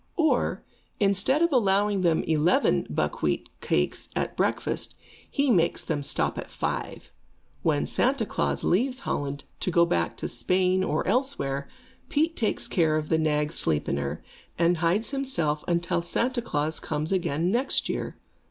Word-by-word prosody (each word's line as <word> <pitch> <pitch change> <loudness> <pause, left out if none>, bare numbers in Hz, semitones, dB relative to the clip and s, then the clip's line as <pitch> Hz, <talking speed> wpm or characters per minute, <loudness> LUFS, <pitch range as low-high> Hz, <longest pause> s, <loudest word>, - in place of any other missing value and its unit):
Or, 320 -2 +1 0.4
instead 200 - +3
of 340 - +2
allowing 205 -3 +2
them 170 -3 +2
eleven 165 - +2
buckwheat - - -1
cakes - - 0
at - - -2
breakfast, - - -1 0.3
he 280 -2 +1
makes 170 -6 +2
them 150 -3 -1
stop 140 - -1
at - - -7
five. - - -4 0.5
When 150 -3 +1
Santa 260 -2 +1
Klaas - - -1
leaves 255 +8 +1
Holland 140 - -3 0.2
to - - -1
go 170 -1 +4
back 85 - -1
to - - -3
Spain, 185 0 +1
or 155 -4 -1
elsewhere, 140 - -1 0.4
Pete 320 +3 +1
takes 220 - -1
care 160 -3 +2
of 155 -1 -2
the 160 - +3
nag 150 -1 +1
Sleipnir, 75 - -1 0.3
and 170 +1 +3
hides 175 +9 +1
himself 170 - 0
until 170 0 0
Santa 240 +8 0
Klaas 155 -7 -2
comes 155 +2 -2
again 170 -2 0
next 250 +5 +1
year. - - -3
175 Hz, 145 wpm, -26 LUFS, 155-235 Hz, 0.5 s, go